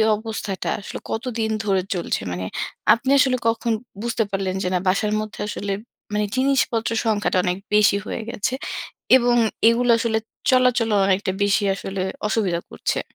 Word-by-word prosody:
অবস্থাটা 215 -3 -4
আসলে 200 - -7
কতদিন 225 -1 -2
ধরে 195 -3 +2
চলছে? 175 - -1
মানে 90 +1 -3 0.5
আপনি 260 +3 -2
আসলে 255 -1 +3
কখন 230 0 +1 0.3
বুঝতে 235 0 0
পারলেন 190 -1 -1
যে, - - -1
না 180 - +2
বাসার 210 +3 +2
মধ্যে 215 -1 -6
আসলে 200 -1 -3 0.3
মানে 210 0 +1
জিনিসপত্রের 250 -4 +1
সংখ্যাটা 205 -3 +1
অনেক 180 -1 0 0.2
বেশি 210 -1 +5
হয়ে - - -4
গেছে 235 +3 -2 0.6
এবং 245 -1 +2 0.3
এগুলো 240 +1 +3
আসলে 225 -1 0 0.3
চলাচলও 250 -4 +3
অনেকটা 190 0 +1
বেশি 205 +1 +2
আসলে 195 -1 -4 0.3
অসুবিধা 195 -6 0
করছে? - - -2
215 Hz, 145 wpm, -22 LUFS, 195-235 Hz, 0.6 s, বেশি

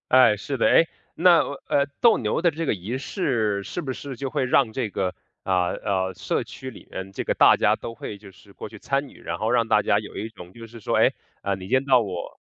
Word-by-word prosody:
哎， 130 -4 +7
是 135 +7 -4
的。 - - +3
哎， 165 - +5 0.3
那 175 -1 +6
呃， - - -1 0.2
呃， 140 - +3 0.2
斗 235 -2 +6
牛 110 +6 -1
的 170 -1 +3
这 165 +2 -4
个 - - +1
仪 105 +6 -4
式 115 - -1
是 175 - -5
不 135 -5 -4
是 135 -1 -8
就 135 +1 -3
会 145 0 -1
让 125 -2 +2
这 120 -3 -2
个， 95 -2 -2 0.3
呃， 90 -2 +1
呃， 95 -1 -1
社 - - -2
区 130 - -9
里 - - -13
面 95 +1 -7
这 - - -3
个 - - 0
大 - - +6
家 - - +2
都 115 - -7
会 105 - -7
就 100 0 -14
是 100 +1 -19
过 - - -8
去 110 - -12
参 140 +6 -1
与， - - -16
然 - - -4
后 110 - -1
让 115 -2 +2
大 105 - +4
家 100 0 +2
有 105 - -9
一 110 - -3
种 90 -5 -12
就 115 +3 -11
是 115 0 -12
说， - - 0
哎， - - +4 0.3
呃， 100 0 0
你 95 0 -9
见 130 +1 +2
到 130 -3 +5
我 95 -5 -6
115 Hz, 275 characters per minute, -24 LUFS, 100-135 Hz, 0.3 s, 哎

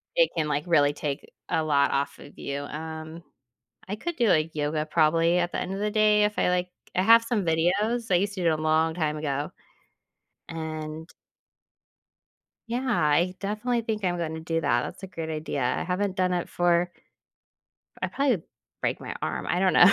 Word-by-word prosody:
it - - +5
can, 155 -2 0
like, 150 0 0
really 145 -4 +4
take 145 -1 -4 0.2
a 160 - +1
lot 140 -2 +3
off 140 0 -1
of - - -13
you. 140 0 -4
Um, 160 +2 -7 0.7
I 205 - -2
could 340 +9 -4
do, 235 -3 +3
like, 155 -3 +3
yoga 150 +1 -1
probably 165 +2 +3
at 175 0 0
the - - -1
end 185 - -3
of 195 - -4
the 210 - 0
day 210 0 +4
if 210 0 -1
I - - +3
like 180 0 0 0.3
I 185 - +3
have 230 +3 +7
some 230 -4 0
videos. 200 +9 +1
I - - +4
used 200 +3 0
to 185 - -4
do - - +1
it 155 -1 +2
a - - -4
long 160 +1 +2
time 155 -3 -1
ago. 145 -1 -2 1.0
And 160 0 -5 1.6
Yeah, 245 +3 -2
I 175 -4 +2
definitely 220 +4 -1
think 220 -2 -3
I'm 175 -1 +1
gonna 160 -1 -3
do 165 0 -1
that, - - +2
that's 185 - -8
a - - -5
great 165 -3 -6
idea, 155 -3 -3 0.2
I - - -2
haven't 190 +1 -1
done 185 -1 +1
it 175 -1 -1
for 175 0 +2 1.1
I - - +1
probably 265 - +1 0.4
break - - 0
my - - -6
arm, - - -2
I 175 - +1
don't 190 0 +3
know. 180 - +8
170 Hz, 195 wpm, -26 LUFS, 155-200 Hz, 1.6 s, know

